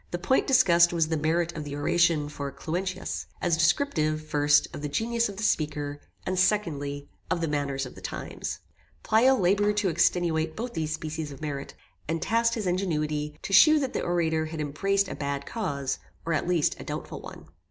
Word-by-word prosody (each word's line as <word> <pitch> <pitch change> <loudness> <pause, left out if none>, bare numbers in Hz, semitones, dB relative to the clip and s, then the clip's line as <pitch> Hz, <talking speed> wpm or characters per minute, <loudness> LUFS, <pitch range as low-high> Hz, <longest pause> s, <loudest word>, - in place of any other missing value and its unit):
The 175 - -2
point 220 +10 +1
discussed 175 -11 +5
was 165 -2 +1
the 160 - +1
merit 165 +3 0
of 155 - -4
the 145 -1 -6
oration 155 0 +2
for 140 -1 -5
Cluentius, 185 +5 -4
as 175 -3 +1
descriptive, 160 - +1
first, 145 0 +3
of - - -6
the 150 - -3
genius 230 +8 0
of 200 - -8
the 220 - -4
speaker; 145 -5 -1 0.2
and, 185 0 -1
secondly, 145 -8 0 0.2
of - - 0
the 165 - -1
manners 140 -2 -1
of 125 - -9
the - - -13
times. - - -5 0.4
Pleyel 255 +5 +4
laboured 205 +3 +2
to 205 -3 +2
extenuate 165 -1 +1
both 235 +2 -5
these 155 -1 -2
species 155 -1 -5
of 135 - -10
merit, 145 -3 -5 0.3
and 165 +2 -1
tasked 230 +5 +1
his 220 -3 -3
ingenuity, 150 -5 -1
to 195 - -4
shew 310 +10 +8
that 270 -3 -1
the - - -1
orator 160 -2 0
had 160 0 -6
embraced 195 +7 0
a - - -5
bad 140 -1 -3
cause; 140 - -3 0.3
or, 165 - 0
at 155 - -1
least, 175 -4 +1
a - - -6
doubtful - - -6
one. - - -10
165 Hz, 195 wpm, -27 LUFS, 150-190 Hz, 0.4 s, shew